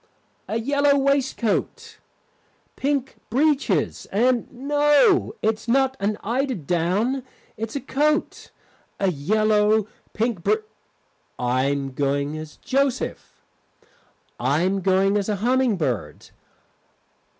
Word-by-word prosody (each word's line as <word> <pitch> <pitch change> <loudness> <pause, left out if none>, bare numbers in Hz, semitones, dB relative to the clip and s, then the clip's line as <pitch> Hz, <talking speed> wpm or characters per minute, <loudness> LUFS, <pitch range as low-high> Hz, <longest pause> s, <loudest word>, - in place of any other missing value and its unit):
A 220 - -1
yellow 285 +4 +2
waistcoat, 270 -5 -1 0.8
pink 275 -1 -1
breeches, 290 +4 +1
and 240 +3 +1
no, 295 - +3
it's 220 +1 -1
not 265 +2 +2
an 205 +1 -1
eider 260 +4 -1
down, 180 - 0 0.3
it's 225 +2 -5
a 280 - -2
coat. 300 +4 -1 0.5
A 195 -2 +2
yellow 210 +6 +2 0.3
Pink 225 -4 -1
br - - +3 0.8
I 125 +1 0
am 140 -1 -1
going 140 +2 -1
as 155 -1 -8
Joseph. 270 -1 -2 1.0
I 140 +7 +1
am 190 +1 0
going 195 +2 +2
as 205 0 -2
a 210 - +1
humming 245 +1 +1
bird. 120 - -3
220 Hz, 105 wpm, -23 LUFS, 180-270 Hz, 1.0 s, no